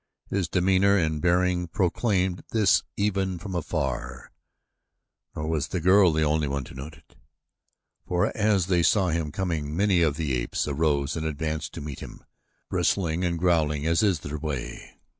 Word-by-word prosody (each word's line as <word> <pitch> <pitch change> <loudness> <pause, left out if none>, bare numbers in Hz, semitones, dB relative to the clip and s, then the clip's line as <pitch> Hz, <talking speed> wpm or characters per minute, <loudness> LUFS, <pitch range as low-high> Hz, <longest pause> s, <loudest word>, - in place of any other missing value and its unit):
His 95 -4 0
demeanor 95 +3 +3
and 80 -4 0
bearing 90 0 +2
proclaimed 90 +1 0
this 110 -2 +3 0.2
even 95 -2 0
from 95 +3 -7
afar, 65 -7 -3 1.0
nor 75 0 -4
was 80 -3 -1
the 90 - -3
girl 95 +1 +5
the 80 0 +1
only 75 0 +1
one 70 0 -2
to - - -12
note 70 +4 -8
it. 75 - -25 0.9
For 90 0 0
as 105 -4 +2
they 90 -2 +2
saw 95 +2 +3
him 80 -2 -1
coming 80 -4 -3
many 95 -3 +3
of 75 -3 +2
the 75 -5 -1
apes - - -2
arose 70 -1 0
and 80 - -3
advanced 80 +1 -3
to - - -6
meet 70 -2 -7
him, - - -10 0.4
bristling 85 -2 0
and 85 -1 0
growling 80 -4 +1
as 80 0 +2
is 95 -8 +2
their 75 +1 -5
way. 65 -6 -6
85 Hz, 165 wpm, -26 LUFS, 75-95 Hz, 1.0 s, girl